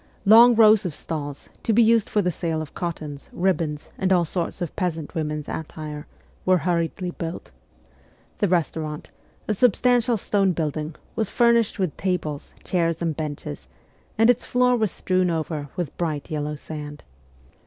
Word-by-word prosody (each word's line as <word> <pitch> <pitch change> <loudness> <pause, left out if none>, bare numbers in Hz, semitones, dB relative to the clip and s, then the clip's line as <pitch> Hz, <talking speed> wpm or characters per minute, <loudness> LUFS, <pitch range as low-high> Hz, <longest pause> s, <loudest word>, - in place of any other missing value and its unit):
Long 230 +4 +8
rows 215 -2 +6
of 175 -6 -4
stalls, 145 -3 -5
to 225 - +1
be 235 +2 +6
used 225 -1 +3
for 210 - +1
the 180 - +1
sale 165 0 -2
of 155 -2 -7
cottons, 155 -5 -5
ribbons, 170 -5 -1
and 190 0 +1
all 175 -2 +4
sorts 170 +2 -3
of 175 - -4
peasant 165 -5 -3
women's 150 -2 -3
attire, 155 -1 -6 0.4
were 185 0 +4
hurriedly 175 +1 -1
built. 165 0 -6 0.9
The 205 - +2
restaurant, 160 -3 -2 0.4
a 215 - +1
substantial 245 +2 +3
stone 195 -2 +1
building, 155 -1 -3 0.2
was 220 -3 -1
furnished 235 -2 +3
with 185 -6 -1
tables, 170 -6 -2
chairs 165 -2 0
and 165 -2 -1
benches, 145 - -5 0.5
and 225 +1 +5
its 245 - -2
floor 250 0 +3
was 220 -5 +1
strewn 185 -1 +1
over 155 -3 -3
with 175 -4 -4
bright 155 -4 -2
yellow 150 0 -2
sand. 150 -1 -8
170 Hz, 155 wpm, -24 LUFS, 155-200 Hz, 0.9 s, Long